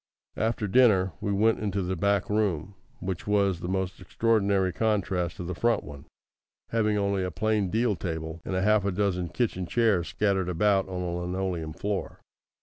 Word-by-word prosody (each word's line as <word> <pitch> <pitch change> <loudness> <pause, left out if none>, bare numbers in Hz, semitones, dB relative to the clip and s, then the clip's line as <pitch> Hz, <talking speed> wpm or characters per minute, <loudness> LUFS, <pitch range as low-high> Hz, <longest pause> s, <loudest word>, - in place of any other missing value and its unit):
After 110 -1 0
dinner, 95 -5 +4
we 100 - -1
went 110 +3 +3
into 100 -2 -1
the 95 +1 -2
back 100 +2 +1
room, 100 -4 0 0.3
which 95 0 -4
was 100 -4 +2
the 90 - -5
most 95 0 -2
extraordinary 100 -2 +1
contrast 95 -5 0
to - - -5
the 90 +1 -4
front 115 +4 +1
one, 70 -1 -10 0.6
having 105 -2 +1
only 100 -1 0
a 90 - -1
plain 105 +2 0
deal 110 +1 +1
table, 80 -1 -5
and 95 - -3
half 105 +2 +3
a 100 - 0
dozen 90 -2 0
kitchen 95 -7 -1
chairs 105 -8 +2
scattered 95 +2 0
about 95 +2 +2
on 90 -1 -3
a 90 - -2
linoleum 90 -3 -3
floor. 100 +3 -3
95 Hz, 170 wpm, -27 LUFS, 90-105 Hz, 0.6 s, dinner